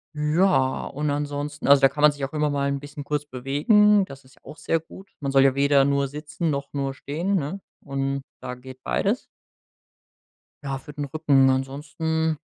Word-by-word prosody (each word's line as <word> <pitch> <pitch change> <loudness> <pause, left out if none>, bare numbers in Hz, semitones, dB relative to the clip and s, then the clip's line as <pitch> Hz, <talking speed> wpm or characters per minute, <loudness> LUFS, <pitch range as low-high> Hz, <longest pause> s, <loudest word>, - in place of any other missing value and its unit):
Ja 150 -2 +2
und 150 +1 -2
ansonsten 145 0 -3
also 140 -1 +7
da 135 - +8
kann 140 +3 -6
man 150 0 +7
sich 145 -1 -4
auch 135 - -10
immer 150 -1 +1
mal 140 -1 0
'n 140 0 -1
bisschen 145 +1 -8
kurz 150 +1 -2
bewegen. 190 - +3
Das 135 -4 -12
ist 130 0 -21
ja - - -27
auch 155 - -11
sehr 165 - 0
gut. 190 +4 -14
Man 140 -2 -2
soll 135 0 +5
ja 135 -1 +4
weder 140 0 +4
nur 140 0 +1
sitzen 150 +3 -4
noch 140 0 -3
nur 135 -1 -2
stehen, 170 +9 -2
ne, 180 +4 -2 0.2
und 135 0 -2 0.2
da 125 - -5
geht 130 +1 -12
beides. 210 +6 0 1.4
Ja, 135 -1 -3
für 150 +3 -11
den 145 0 -4
Rücken 140 -2 +3
ansonsten 150 +4 -1
145 Hz, 190 wpm, -24 LUFS, 135-150 Hz, 1.4 s, da